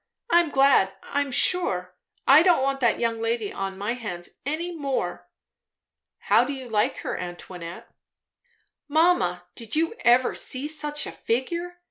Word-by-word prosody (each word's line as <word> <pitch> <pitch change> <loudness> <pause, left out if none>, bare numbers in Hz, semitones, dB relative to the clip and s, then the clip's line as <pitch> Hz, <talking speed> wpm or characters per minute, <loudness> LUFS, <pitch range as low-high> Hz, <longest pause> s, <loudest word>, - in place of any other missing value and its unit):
I'm 345 -2 +4
glad, 270 -9 +3
I'm 285 -1 -2
sure. 185 - +2 0.3
I 280 +3 +8
don't 345 -6 +4
want 275 0 0
that 235 -3 +2
young 230 -1 -1
lady 225 -2 -2
on 195 0 -4
my 205 +4 -2
hands 180 -8 -6 0.2
any 335 +4 -3
more." 280 -4 -3 0.9
"How - - +4
do 285 - -3
you 260 -2 -8
like 210 -1 +1
her, - - -3
Antoinette?" 175 -1 -8 1.0
"Mamma, 290 - +2
did 230 +1 -5
you 325 +5 +1
ever 245 +1 +4
see 265 +3 0
such 300 -1 -2
a - - -6
figure? 340 +9 -3
260 Hz, 145 wpm, -25 LUFS, 210-305 Hz, 1.0 s, I